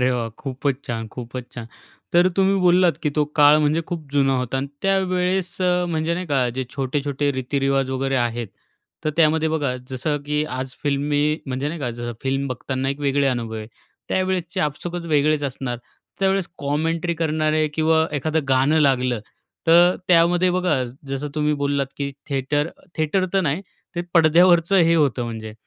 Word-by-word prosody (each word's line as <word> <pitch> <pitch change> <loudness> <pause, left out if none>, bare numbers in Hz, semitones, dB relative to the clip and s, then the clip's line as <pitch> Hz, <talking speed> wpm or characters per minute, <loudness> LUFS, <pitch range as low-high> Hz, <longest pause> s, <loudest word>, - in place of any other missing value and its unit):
अरे 125 +1 +3
वा! 115 -2 -2
खूपच 135 0 -2
छान 115 -1 -4
खूपच 125 0 -7
छान. 120 -3 -7 0.5
तर 175 +2 +5
तुम्ही 195 0 +3
बोललात, 180 -1 +4
की 150 - +1
तो 150 -1 +2
काळ 150 0 +7
म्हणजे 155 +2 +2
खूप 165 -4 -5
जुना 135 -1 +3
होता 125 +1 -2
आणि 135 - -2 0.2
त्यावेळेस 185 -1 0 0.3
म्हणजे 160 0 0
नाही 180 +1 -4
का, 135 -5 +1
जे 130 +2 -3
छोटे-छोटे 140 +1 -1
रीती-रिवाज 135 0 0
वगैरे 135 +1 -1
आहेत. 120 -2 -1 0.6
तर 155 - +1
त्यामध्ये 160 -1 +3
बघा, 145 -5 -1 0.2
जसं 145 +4 -1
की 150 +1 0
आज 130 -1 -5
फिल्मी, 145 +2 +1
म्हणजे 135 +2 -2
नाही 165 +1 -5
का, 125 -4 -2
जसं 120 0 -5
फिल्म 135 +1 -1
बघताना 130 +1 -3
एक 140 +1 -3
वेगळे 140 0 +1
अनुभव 120 -3 -2
आहे. 110 -1 -6 0.4
त्यावेळेसचे 185 -2 -1
आपसूकच 170 +4 -3
वेगळेच 150 -1 +2
असणार. 130 -2 -4 0.4
त्यावेळेस 195 -2 +1
कॉमेंट्री 165 +4 -1
करणारे 155 -1 +1
किंवा 160 0 +3
एखादं 155 +3 0
गाणं 135 +4 +3
लागलं. 125 -5 +2 0.5
तर 175 +2 +6
त्यामध्ये 175 +1 +4
बघा 180 -7 +1 0.2
जसं 135 +2 -3
तुम्ही 150 0 +1
बोललात, 140 -1 0
की 140 -1 -3 0.2
थिएटर, 145 +2 0 0.3
थिएटर 175 +5 +1
तर 195 - +3
नाही 155 0 0 0.3
ते 175 - -1
पडद्यावरचं 170 +3 +5
हे 170 -2 +5
होतं 140 -6 +2
म्हणजे. 110 -2 -6
145 Hz, 165 wpm, -22 LUFS, 135-165 Hz, 0.6 s, काळ